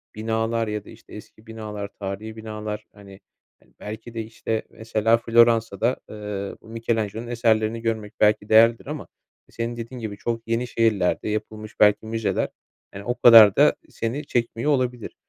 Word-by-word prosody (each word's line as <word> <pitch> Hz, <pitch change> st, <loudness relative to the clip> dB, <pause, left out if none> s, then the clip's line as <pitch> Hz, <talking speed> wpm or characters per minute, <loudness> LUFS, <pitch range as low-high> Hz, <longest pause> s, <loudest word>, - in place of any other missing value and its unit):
binalar 115 Hz, +1 st, -1 dB
ya 105 Hz, -1 st, -4 dB
da, -, -, -13 dB
işte, 115 Hz, 0 st, -15 dB
eski 110 Hz, +1 st, -13 dB
binalar, 105 Hz, -2 st, -6 dB
tarihî 105 Hz, +3 st, -5 dB
binalar, 110 Hz, -1 st, -6 dB
hani, 100 Hz, -1 st, -14 dB, 0.4 s
hani, -, -, -28 dB
belki 110 Hz, +3 st, -8 dB
de 115 Hz, -, -3 dB
işte 110 Hz, 0 st, -4 dB
mesela 110 Hz, 0 st, +1 dB
Floransa'da, 115 Hz, 0 st, +3 dB
eee, 105 Hz, -2 st, -5 dB
Michelangelo'nun 115 Hz, 0 st, -3 dB
eserlerini 115 Hz, -1 st, +1 dB
görmek 110 Hz, -2 st, -3 dB
belki 105 Hz, 0 st, +3 dB
değerlidir 115 Hz, +1 st, +5 dB
ama 150 Hz, +1 st, -6 dB, 0.4 s
senin 115 Hz, +1 st, -4 dB
dediğin 120 Hz, +2 st, -7 dB
gibi 105 Hz, -2 st, -5 dB
çok 115 Hz, +1 st, -4 dB
yeni 115 Hz, +2 st, -1 dB
şehirlerde 110 Hz, -4 st, +1 dB
yapılmış 110 Hz, 0 st, -5 dB
belki 105 Hz, +1 st, +4 dB
müzeler, 110 Hz, -1 st, -1 dB, 0.4 s
yani, 100 Hz, -, -8 dB
o 120 Hz, 0 st, -1 dB
kadar 110 Hz, -4 st, +9 dB
da -, -, +5 dB
seni 130 Hz, +6 st, -4 dB
çekmiyor 120 Hz, +3 st, -1 dB
olabilir. 125 Hz, -4 st, -1 dB
110 Hz, 150 wpm, -23 LUFS, 105-115 Hz, 0.4 s, kadar